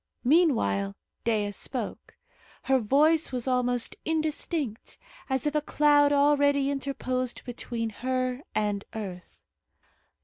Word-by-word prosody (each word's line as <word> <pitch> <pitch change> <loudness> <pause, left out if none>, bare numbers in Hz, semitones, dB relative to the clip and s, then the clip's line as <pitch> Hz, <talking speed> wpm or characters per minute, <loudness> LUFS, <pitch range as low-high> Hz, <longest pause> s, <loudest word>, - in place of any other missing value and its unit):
Meanwhile, 235 - +2 0.3
Dea 210 -3 +1
spoke. 230 +3 -6 0.5
Her 265 0 +3
voice 300 +8 +3
was 250 -1 -3
almost 245 -2 0
indistinct, 310 - -2 0.3
as 265 0 0
if 295 - +1
a 300 - +1
cloud 290 -1 +4
already 285 -1 +3
interposed 255 -2 -3
between 235 -2 -4
her 255 +2 -2
and 205 -1 0
earth. 180 - -8
255 Hz, 105 wpm, -27 LUFS, 225-290 Hz, 0.5 s, cloud